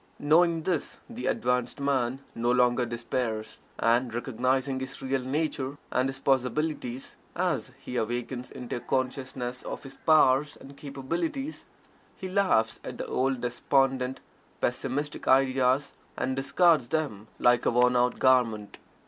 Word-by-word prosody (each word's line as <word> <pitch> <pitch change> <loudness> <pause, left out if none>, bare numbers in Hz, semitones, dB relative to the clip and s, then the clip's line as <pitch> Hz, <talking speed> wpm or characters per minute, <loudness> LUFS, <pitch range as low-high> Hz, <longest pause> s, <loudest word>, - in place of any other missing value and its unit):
Knowing 165 +2 +3
this 175 -4 -2
the 240 0 -5
advanced 125 - 0
man 135 -2 0
no 120 +1 0
longer 125 0 +3
despairs, 115 -2 -3 0.2
and, 120 0 +2
recognizing 130 +2 0
his 130 +1 -6
real 135 0 -1
nature, 140 0 -2
and 130 +1 +1
his 135 - -5
possibilities, 135 -1 -1 0.2
as - - -1
he 125 - -5
awakens 120 +2 -3
into 125 -1 -5
a - - -4
consciousness 130 -1 -3
of - - -6
his 135 -1 -11
powers 150 -2 +4
and 140 +1 -13
capabilities, 165 - -4 0.5
he 190 - -5
laughs 185 - +2
at - - -7
the - - -4
old 130 -1 0
despondent, 130 +1 +1 0.4
pessimistic 135 +4 -2
ideas, 130 +1 +3 0.2
and 130 0 -1
discards 140 0 +3
them 135 -10 -2
like 120 0 +3
a - - +6
worn 125 +1 +3
out 125 0 +2
garment. 115 -5 +2
130 Hz, 135 wpm, -28 LUFS, 125-140 Hz, 0.5 s, a